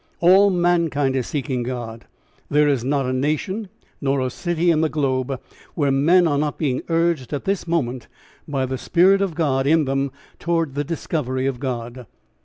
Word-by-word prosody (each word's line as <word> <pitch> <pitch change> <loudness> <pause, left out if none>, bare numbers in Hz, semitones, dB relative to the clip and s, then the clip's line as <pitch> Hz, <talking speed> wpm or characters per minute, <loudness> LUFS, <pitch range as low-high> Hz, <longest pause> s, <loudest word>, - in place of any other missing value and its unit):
All 190 +4 +6
mankind 170 -7 +1
is 130 -2 -1
seeking 130 -3 -2
God. 120 -2 -5 0.4
There 150 0 +3
is 135 -5 +1
not 135 +1 0
a 130 - -1
nation 155 +10 -2 0.3
nor 140 -1 +1
a 130 -1 -1
city 175 +3 0
in 155 -1 +2
the 160 - +1
globe 135 -3 -1 0.4
where 145 -3 +1
men 165 +6 +4
are 145 -2 +1
not 150 0 -1
being 135 -5 -1
urged 165 -5 0
at 145 - -3
this 195 -2 -1
moment 130 -8 -1 0.4
by 135 -3 -1
the 130 0 -4
spirit 190 +6 +4
of 190 -5 -1
God 140 -5 +1
in 160 0 +4
them 135 0 -1 0.3
towards 165 -4 -1
the 145 +1 -1
discovery 135 -4 -2
of 135 -3 -2
God. 120 -2 -5
145 Hz, 180 wpm, -21 LUFS, 130-170 Hz, 0.4 s, All